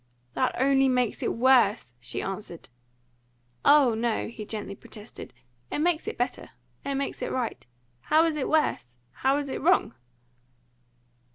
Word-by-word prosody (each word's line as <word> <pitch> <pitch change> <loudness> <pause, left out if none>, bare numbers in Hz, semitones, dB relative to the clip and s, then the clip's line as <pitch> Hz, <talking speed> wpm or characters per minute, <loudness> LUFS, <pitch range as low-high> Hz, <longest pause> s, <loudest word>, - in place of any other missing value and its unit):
"That 255 - 0
only 270 0 +4
makes 250 -3 0
it - - 0
worse!" 235 - +3
she 120 0 -4
answered. 195 -3 -7 0.9
"Oh 285 -5 +6
no!" 225 0 -1
he 225 -2 -8
gently 210 -3 -5
protested. 210 +2 -11 0.4
"It - - -1
makes 320 +1 0
it - - -4
better. 245 +1 -3 0.3
It 280 - -2
makes 275 +1 -3
it - - -2
right. 250 -3 -3 0.5
How 315 +2 +5
is 325 -2 0
it 290 - -2
worse? 125 - 0
How 270 +1 +1
is 290 -1 -3
it 265 - -4
wrong?" 360 +6 +3
255 Hz, 150 wpm, -27 LUFS, 220-280 Hz, 0.9 s, Oh